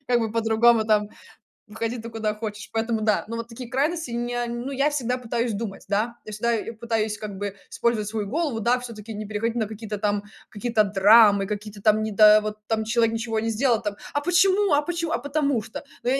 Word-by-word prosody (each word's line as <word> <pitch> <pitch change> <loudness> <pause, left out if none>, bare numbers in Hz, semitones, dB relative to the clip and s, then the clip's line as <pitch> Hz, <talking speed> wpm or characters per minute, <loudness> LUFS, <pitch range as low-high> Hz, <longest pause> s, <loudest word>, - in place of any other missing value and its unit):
как 245 -2 +2
бы 225 -1 -1
по-другому, 225 0 +3
там, 210 -1 +2 0.6
выходи 230 +3 -4
ты 230 +1 -7
куда 215 -1 -2
хочешь. 215 -1 -6
Поэтому 225 0 -1
да 215 -1 +2
Но 230 +1 -4
вот 230 0 -5
такие 235 +1 -9
крайности 305 +1 -1
не 240 +1 -2
ну, 240 +3 -4
я 280 +2 +1
всегда 250 -4 -1
пытаюсь 235 -1 -2
думать, 200 -2 -5
да. 215 +4 0
Я 215 - -8
всегда 235 +3 0 0.3
пытаюсь 220 -2 -1
как 210 -2 -7
бы 205 -1 -4 0.2
использовать 230 -3 0
свою 210 -1 -3
голову, 285 -1 -1
да, 240 +3 +2
всё-таки 225 -3 -8
не 215 +1 -5
переходить 215 +3 -2
на 220 -3 0
какие-то 215 0 -6
там 205 0 0 0.3
какие-то 220 0 +1
драмы, 205 0 +5
какие-то 210 0 -6
там 215 +1 +3
не 220 - -2
да, 215 +1 +7
вот 215 0 -4
там 220 -1 0
человек 230 0 +1
ничего 225 -1 -2
не 225 +1 -1
сделал, 230 0 +1
там: 205 -1 -3 0.2
"А 290 - 0
почему 375 +3 +3
а 290 - +4
почему?" 335 0 -3
А - - +1
потому 285 -4 0
что. 220 - -8 0.2
Но 245 - 0
я 265 - +2
225 Hz, 215 wpm, -24 LUFS, 215-240 Hz, 0.6 s, да